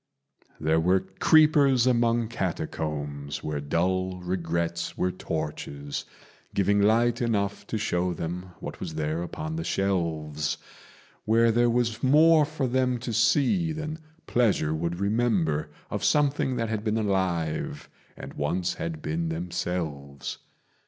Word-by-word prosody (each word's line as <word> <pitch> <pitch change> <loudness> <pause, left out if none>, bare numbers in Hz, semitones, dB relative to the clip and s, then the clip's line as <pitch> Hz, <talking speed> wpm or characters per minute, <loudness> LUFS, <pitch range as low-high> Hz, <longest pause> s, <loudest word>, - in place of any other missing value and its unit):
There 80 +1 +2
were 90 +3 +3
creepers 140 +5 +4
among 120 -2 +2
catacombs 75 -7 -3
where 75 -1 -2
dull 90 +5 0
regrets 85 -1 -2
were 90 - +1
torches, 75 -4 -4 0.5
Giving 100 +1 +3
light 115 +3 +3
enough 100 -4 -1
to 110 - -2
show 90 -4 0
them 90 +2 -5
what - - -7
was 80 - -5
there 80 +1 -1
upon 155 - -4
the 165 - -2
shelves 80 - -1 0.7
Where 115 +1 +4
there 120 +1 +3
was 115 -1 0
more 155 +3 +6
for 150 -2 -3
them 125 0 +1
to 120 0 -5
see 145 - +3
than 155 0 -4 0.3
pleasure 105 -10 +2
would 85 +2 -2
remember 100 -8 +1 0.2
Of - - -3
something 145 -3 +2
that 115 -2 -1
had 110 -2 -2
been 110 0 0
alive 95 -7 -1 0.3
and - - -8
once 85 +5 -1
had 80 -2 -5
been 80 +2 -1
themselves. 80 -5 -4
95 Hz, 130 wpm, -27 LUFS, 80-120 Hz, 0.7 s, more